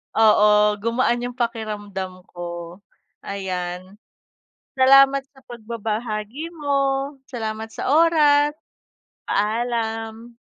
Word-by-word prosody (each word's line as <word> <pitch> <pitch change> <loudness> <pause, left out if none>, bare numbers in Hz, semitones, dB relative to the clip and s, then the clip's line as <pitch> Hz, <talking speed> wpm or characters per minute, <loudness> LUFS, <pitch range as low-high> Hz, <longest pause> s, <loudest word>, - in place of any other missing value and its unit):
Oo 210 -1 +5
gumaan 235 +2 +1
'yung 245 0 -5
pakiramdam 205 -6 -4
ko, 175 +1 -7 0.5
ayan. 185 -1 -5 0.8
Salamat 275 +1 +6
sa 270 - -19
pagbabahagi 230 +5 -5
mo, 275 -2 -1
salamat 220 -3 -4
sa - - -3
oras, 295 -2 +4 0.7
paalam. 225 +1 -2
225 Hz, 80 wpm, -22 LUFS, 210-270 Hz, 0.8 s, Salamat